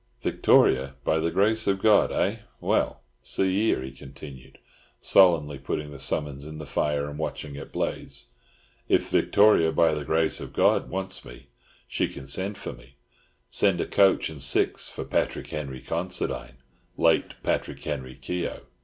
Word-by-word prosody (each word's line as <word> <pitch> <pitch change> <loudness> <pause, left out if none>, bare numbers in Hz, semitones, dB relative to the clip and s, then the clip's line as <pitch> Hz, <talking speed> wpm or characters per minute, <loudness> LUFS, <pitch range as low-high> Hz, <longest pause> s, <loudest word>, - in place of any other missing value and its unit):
"Victoria 65 +1 +3
by 80 - +1
the 80 +1 0
Grace 110 +5 +1
of 95 -1 +2
God, 105 0 +4
eh? - - 0 0.2
Well, - - 0 0.2
see 95 -1 +1
here," 100 -9 +1
he 65 - -7
continued, 65 0 -12 0.4
solemnly 80 -7 +4
putting 75 +2 -4
the 70 - -10
summons 70 0 0
in 75 0 -8
the 75 - -7
fire 70 0 -1
and 75 +1 -7
watching 75 -1 -4
it 70 - -9
blaze, 70 +1 -3 0.6
"if - - +2
Victoria 100 -6 +4
by 80 -1 +3
the 75 -1 -3
Grace 80 +2 +1
of - - -8
God - - +2
wants 95 +1 -4
me, - - -13 0.4
she - - 0
can 70 - -10
send 95 +9 -2
for - - -6
me—send 65 +4 -2
a - - 0
coach 95 -1 +3
and 75 -3 -10
six 65 - +1
for - - -6
Patrick - - -2
Henry 70 -4 -5
Considine, 85 -7 -3 0.4
late 80 -1 +2
Patrick - - -2
Henry 65 -4 -5
Keogh! 85 +7 -4
75 Hz, 155 wpm, -26 LUFS, 70-90 Hz, 0.6 s, God